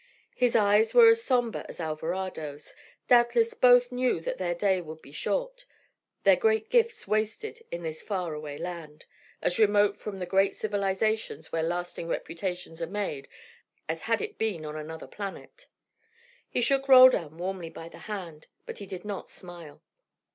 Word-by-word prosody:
His 245 -2 +2
eyes 210 - +4
were 470 -2 +9
as 455 0 +3
sombre 245 - 0
as - - -9
Alvarado's: 160 -2 -4 0.3
doubtless 240 -1 +4
both 245 0 +5
knew 250 -6 +1
that - - -4
their 175 -2 -1
day 190 0 +1
would 160 -1 -9
be 140 - -15
short, - - -3 0.6
their - - +6
great 445 -2 +1
gifts 465 -2 +2
wasted 220 - -2
in 170 0 -5
this 160 -1 -5
far 180 -6 -3
away 150 -1 -6
land, 165 -4 -7 0.4
as 175 - +1
remote 205 -1 +4
from 205 -2 -6
the 180 - -4
great 195 +2 +2
civilisations 200 -4 -1
where 165 - 0
lasting 175 0 -3
reputations 170 0 -4
are 165 - -2
made 185 -8 -4 0.6
as - - -3
had - - 0
it 430 -1 -6
been 200 -8 -2
on 150 0 -6
another 160 +1 -7
planet. 205 - -8 0.8
He - - 0
shook 275 +3 +2
Roldan 255 - +7
warmly 180 -1 -4
by 165 0 -9
the - - -13
hand, 175 -7 -7 0.2
but - - -8
he 200 - -8
did 185 0 -8
not 205 -2 -5
smile. 170 -5 -11
195 Hz, 160 wpm, -28 LUFS, 165-240 Hz, 0.8 s, were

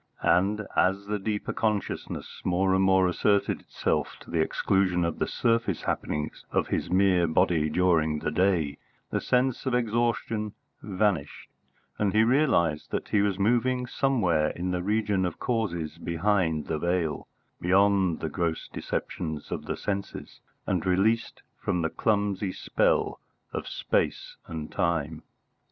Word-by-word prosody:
And, 100 +4 +2
as 95 +2 +2
the 105 0 -2
deeper 105 +1 -2
consciousness 105 -3 -3
more 95 +1 +2
and 95 0 +3
more 95 -1 +4
asserted 100 +3 +1
itself - - -2
to - - -12
the 85 - 0
exclusion 90 +2 +1
of 85 - -3
the - - 0
surface 115 -6 0
happenings 75 0 -3
of - - 0
his - - -1
mere 90 -2 +3
body 80 -1 +2
during 80 -2 +2
the 75 - -2
day, 85 -4 +1 0.3
the - - 0
sense 125 +1 +1
of 125 - +1
exhaustion 115 -2 0 0.3
vanished, 95 -7 -1 0.5
and 100 -2 +1
he 110 +1 +5
realised 110 - +2
that - - -3
he 105 - +3
was 100 -2 +1
moving 125 +5 +2
somewhere 100 - +1
in 90 +3 -3
the 90 -1 -1
region 105 0 +1
of 90 -3 -2
causes 85 -10 -2
behind 85 -3 0
the 75 - -2
veil, 85 -2 -1 0.3
beyond 95 -1 +3
the 80 - -2
gross 85 0 -2
deceptions 80 -2 -4
of - - -4
the - - -3
senses, 100 -1 -5 0.3
and 90 -3 0
released 105 +5 +1 0.2
from 90 -2 -1
the 80 - -1
clumsy 100 -3 0
spell - - 0 0.3
of - - -4
space - - -1
and 80 -2 -6
time. 80 -2 -1
95 Hz, 145 wpm, -27 LUFS, 85-105 Hz, 0.5 s, he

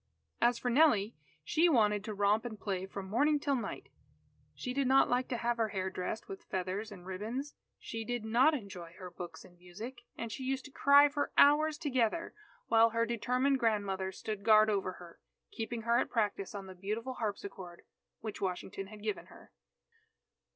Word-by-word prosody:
As 240 0 +4
for 245 +1 -1
Nellie, 235 -7 +4 0.3
she 325 - +3
wanted 210 -7 +3
to 215 - -4
romp 205 +2 +2
and 220 -4 -6
play 190 -2 -3
from 195 0 -7
morning 290 +9 +2
till 285 -1 0
night. 245 - -5 0.7
She 250 - -4
did 275 0 +1
not 270 +1 +5
like 250 +1 +1
to 245 - -2
have 235 0 0
her 225 -1 +1
hair 190 -2 -3
dressed 185 +4 -4
with 195 - -9
feathers 190 +4 -3
and 180 -3 -11
ribbons. 220 +10 -4 0.2
She 225 0 -6
did 240 -1 -3
not 250 +8 +4
enjoy 185 - -8
her 180 -1 -8
books 170 -3 -8
and 175 -1 -19
music. 215 +8 -9 0.2
And 230 -1 -4
she 265 - -6
used 260 0 -2
to 285 - -11
cry 285 +2 +6
for 290 0 -2
hours 300 +2 +5
together, 285 +1 0 0.3
while 225 0 +5
her 230 +1 +1
determined 250 +4 +1
grandmother 200 -5 0
stood 205 +1 -5
guard 215 0 +6
over 195 -2 -1
her, 175 -2 -13 0.3
keeping 225 0 -4
her 235 +1 +3
at - - -1
practice 205 -4 -1
on 200 -1 -6
the 190 - -9
beautiful 215 +7 -4
harpsichord, 200 -6 -5 0.4
which 215 -2 -6
Washington 190 +1 -3
had 210 0 -12
given 210 -3 -3
her. - - -16
220 Hz, 185 wpm, -32 LUFS, 195-250 Hz, 0.7 s, cry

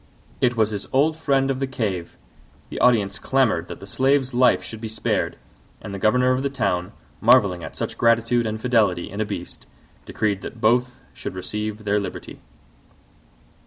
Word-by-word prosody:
It 120 -1 +2
was 110 -1 +2
his 100 -2 -4
old 150 +4 +3
friend 135 -4 +1
of 130 - -3
the 135 - -1
cave! 100 -10 -3 0.5
The - - -5
audience 110 -4 +3
clamoured 110 -12 +1
that - - -8
the - - -10
Slave's 130 +5 +1
life 125 +1 +4
should 110 -1 -9
be 115 - -4
spared: 110 0 -2 0.4
and 100 - -8
the 100 - -5
governor 125 +5 +3
of 130 +1 +1
the 140 - -1
town, 90 -7 -1 0.3
marvelling 105 -7 +4
at 80 - -8
such - - -5
gratitude 115 0 +3
and 110 0 -3
fidelity 110 -8 +1
in 100 +2 -4
a - - +1
beast, 100 -4 -7 0.4
decreed 105 -3 -1
that 115 - -8
both 125 +3 +1
should - - -7
receive 105 +3 -4
their 105 0 +1
liberty. 100 - -7
110 Hz, 175 wpm, -23 LUFS, 100-125 Hz, 0.5 s, life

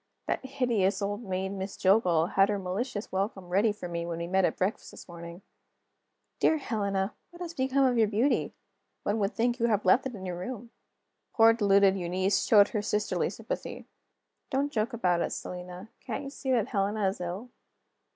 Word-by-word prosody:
That - - -2
hideous 240 -7 0
old 205 +2 -2
maid, 190 -3 -3
Miss 195 0 -5
Jillgall, 180 -4 +3
had 195 +1 +4
her 205 - +1
malicious 200 +4 -4
welcome 190 -1 -2
ready 200 +5 +3
for 205 -3 -7
me 170 -1 -3
when 170 -1 -4
we 170 - -3
met 190 +1 +2
at - - -1
breakfast 190 +4 -1
this - - -12
morning: 170 +1 -10 1.0
"Dear 320 - +4
Helena, 200 -7 -1 0.2
what 345 - -15
has 345 -2 -5
become 265 -1 +2
of 245 -2 +2
your 220 - +5
beauty? 225 +7 +1 0.5
One 210 +2 0
would 200 +1 -1
think 240 +2 +1
you 235 - +2
had 210 -3 +1
left 235 +8 +4
it 250 - -8
in 190 -2 -8
your 175 -1 -4
room!" 235 +3 -6 0.6
Poor 225 0 +7
deluded 200 -3 +4
Eunice 185 +3 +1
showed 205 -2 +6
her 210 - -1
sisterly 210 0 0
sympathy: - - -6 0.6
"Don't 280 +2 0
joke 220 -1 -1
about 180 -7 +1
it, - - 0
Selina: 180 +3 -7
can't 250 +1 -5
you 275 - -6
see 270 - -6
that 240 -5 +2
Helena 200 0 0
is 190 0 -3
ill?" 185 +8 -5
205 Hz, 190 wpm, -29 LUFS, 185-235 Hz, 1.0 s, Poor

